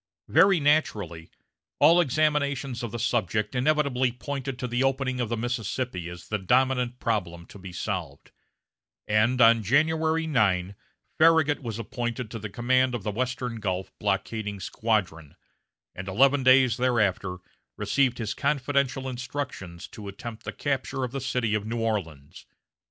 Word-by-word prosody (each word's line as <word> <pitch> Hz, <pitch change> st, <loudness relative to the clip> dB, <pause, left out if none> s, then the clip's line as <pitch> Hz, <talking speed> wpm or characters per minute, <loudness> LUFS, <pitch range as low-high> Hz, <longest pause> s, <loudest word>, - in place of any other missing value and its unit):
Very 195 Hz, -2 st, +5 dB
naturally, 105 Hz, -, 0 dB, 0.5 s
all 165 Hz, +4 st, +6 dB
examinations 140 Hz, -4 st, 0 dB
of 120 Hz, -3 st, -4 dB
the 120 Hz, -, -4 dB
subject 110 Hz, -2 st, 0 dB
inevitably 130 Hz, -2 st, +1 dB
pointed 135 Hz, +1 st, -5 dB
to 125 Hz, -, -3 dB
the 120 Hz, +2 st, 0 dB
opening 135 Hz, -1 st, 0 dB
of 120 Hz, -3 st, -1 dB
the 115 Hz, -, -1 dB
Mississippi 115 Hz, -5 st, -3 dB
as 90 Hz, -1 st, -10 dB
the 105 Hz, -, -2 dB
dominant 125 Hz, +3 st, +1 dB
problem 85 Hz, -8 st, -2 dB
to 100 Hz, -, -13 dB
be 95 Hz, -1 st, -9 dB
solved; 90 Hz, -6 st, -5 dB, 0.8 s
and 110 Hz, +4 st, +2 dB
on 115 Hz, -1 st, +6 dB
January 160 Hz, +7 st, +2 dB
9, 100 Hz, -, +1 dB, 0.5 s
Farragut 160 Hz, -2 st, +5 dB
was 115 Hz, -4 st, -5 dB
appointed 120 Hz, 0 st, -4 dB
to 115 Hz, -, -5 dB
the 105 Hz, 0 st, -6 dB
command 130 Hz, +3 st, +1 dB
of 110 Hz, -, -5 dB
the 105 Hz, -, -2 dB
western 125 Hz, +1 st, -3 dB
Gulf 95 Hz, -3 st, -3 dB
blockading 105 Hz, -3 st, -2 dB
squadron, 90 Hz, -6 st, -2 dB, 0.6 s
and 95 Hz, +1 st, -7 dB
eleven 135 Hz, +8 st, +4 dB
days 130 Hz, -2 st, +5 dB
thereafter 105 Hz, -7 st, +1 dB, 0.4 s
received 130 Hz, -3 st, +1 dB
his 110 Hz, -3 st, -3 dB
confidential 140 Hz, -2 st, 0 dB
instructions 125 Hz, -9 st, -5 dB
to 105 Hz, -3 st, -10 dB
attempt 110 Hz, +3 st, -8 dB
the -, -, -3 dB
capture 135 Hz, -2 st, -2 dB
of 125 Hz, -, -3 dB
the 135 Hz, +1 st, -4 dB
city 125 Hz, -4 st, -1 dB
of 105 Hz, 0 st, -1 dB
New 115 Hz, +1 st, -2 dB
Orleans. 85 Hz, -11 st, -4 dB
120 Hz, 145 wpm, -26 LUFS, 105-135 Hz, 0.8 s, all